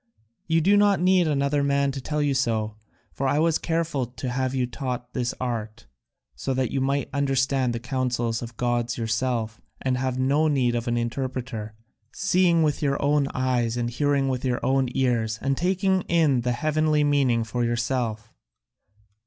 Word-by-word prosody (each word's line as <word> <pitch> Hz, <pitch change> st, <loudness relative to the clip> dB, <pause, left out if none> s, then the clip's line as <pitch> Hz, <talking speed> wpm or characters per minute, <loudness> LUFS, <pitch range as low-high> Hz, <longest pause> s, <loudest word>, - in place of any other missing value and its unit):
You 165 Hz, 0 st, +3 dB
do 200 Hz, +5 st, +4 dB
not 205 Hz, -1 st, +4 dB
need 180 Hz, -1 st, +3 dB
another 140 Hz, -1 st, +1 dB
man 140 Hz, 0 st, +2 dB
to 135 Hz, 0 st, -6 dB
tell 150 Hz, +3 st, -1 dB
you 145 Hz, -1 st, +1 dB
so, 110 Hz, -5 st, 0 dB, 0.4 s
for 135 Hz, -, -1 dB
I 140 Hz, -, +2 dB
was 160 Hz, 0 st, +2 dB
careful 165 Hz, -6 st, -1 dB
to 125 Hz, +1 st, -6 dB
have 130 Hz, +1 st, -1 dB
you 130 Hz, -1 st, +1 dB
taught 125 Hz, -1 st, -5 dB
this 125 Hz, -1 st, -1 dB
art, 115 Hz, -2 st, -4 dB, 0.5 s
so 130 Hz, -, -2 dB
that 130 Hz, -1 st, 0 dB
you 135 Hz, -, -1 dB
might 140 Hz, +1 st, 0 dB
understand 135 Hz, -2 st, +1 dB
the 115 Hz, -, -3 dB
counsels 120 Hz, -2 st, -1 dB
of 120 Hz, -, -5 dB
the 115 Hz, -, -23 dB
gods 120 Hz, 0 st, -1 dB
yourself 115 Hz, 0 st, -2 dB, 0.2 s
and 130 Hz, -1 st, -1 dB
have 130 Hz, -1 st, -1 dB
no 140 Hz, +4 st, +2 dB
need 130 Hz, -5 st, +2 dB
of 120 Hz, +1 st, -2 dB
an 120 Hz, 0 st, 0 dB
interpreter, 120 Hz, -2 st, -4 dB, 0.4 s
seeing 180 Hz, -3 st, +3 dB
with 150 Hz, -2 st, 0 dB
your 140 Hz, -2 st, 0 dB
own 145 Hz, -1 st, +2 dB
eyes 125 Hz, -2 st, 0 dB
and 120 Hz, 0 st, -1 dB
hearing 140 Hz, +1 st, +1 dB
with 130 Hz, -2 st, -2 dB
your 125 Hz, -2 st, 0 dB
own 130 Hz, 0 st, +2 dB
ears 115 Hz, -4 st, +1 dB
and 135 Hz, 0 st, 0 dB
taking 190 Hz, +3 st, +1 dB
the 140 Hz, -8 st, +2 dB
heavenly 155 Hz, +1 st, +2 dB
meaning 135 Hz, -5 st, +2 dB
for 120 Hz, +2 st, -2 dB
yourself. 120 Hz, -2 st, -2 dB
130 Hz, 175 wpm, -25 LUFS, 120-145 Hz, 0.5 s, do